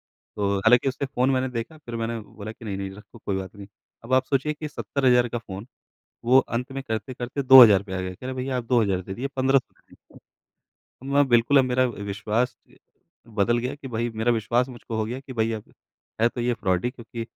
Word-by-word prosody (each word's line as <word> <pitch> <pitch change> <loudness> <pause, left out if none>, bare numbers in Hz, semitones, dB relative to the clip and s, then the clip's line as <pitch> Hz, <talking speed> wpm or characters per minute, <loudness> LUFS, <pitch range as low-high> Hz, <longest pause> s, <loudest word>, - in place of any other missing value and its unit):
तो 100 -1 -3
हालाँकि 125 +5 +4
उससे 140 +2 -3
फ़ोन 130 0 +1
मैंने 130 0 0
देखा, 125 +6 -5
फिर 120 -6 -8
मैंने 115 0 -2
बोला 110 0 -9
कि 115 - -13
नहीं, 100 -2 -3
नहीं 95 0 -4
रखो 105 +4 -14
कोई 95 -1 -1
बात 95 +1 -7
नहीं। 100 -1 -10 0.4
अब 130 +3 -4
आप 130 0 +5
सोचिए 145 +2 0
कि 150 0 -6
70000 125 -4 +2
का 120 - -3
फ़ोन 100 0 -8 0.6
वो 130 +2 +6
अंत 125 +1 -1
में 135 0 -4
करते-करते 120 +3 -4
2000 120 -7 +9
पे 95 -2 -10
आ 95 - -2
गया, 90 0 -4
कह 125 - -10
रहा 130 - -4
भईया 130 0 -2
आप 120 - -3
2000 105 -7 +2
दे 95 +1 -7
दीजिए 135 +4 -3
1500 130 0 +2
दे - - -41
दीजिए। - - -23 0.8
मैं 145 -1 +5
बिल्कुल 120 +4 +4
अब 130 - +5
मेरा 130 0 +2
विश्वास 105 +2 -2
अ, - - -20 0.5
बदल 115 +2 +1
गया 125 +4 -3
कि 140 -2 -10
भई 120 0 -2
मेरा 115 +2 +1
विश्वास 120 +3 +1
मुझको 120 -2 -7
हो 110 - 0
गया 120 +4 -4
कि 135 -1 -10
भई 115 -1 0
अब 110 -2 -7 0.5
है 115 - +5
तो 120 - -6
ये 120 +1 +1
फ्रॉड 90 -3 -1
ही। 125 - +1
क्योंकि 115 -1 -8
120 Hz, 225 wpm, -25 LUFS, 110-130 Hz, 0.8 s, 2000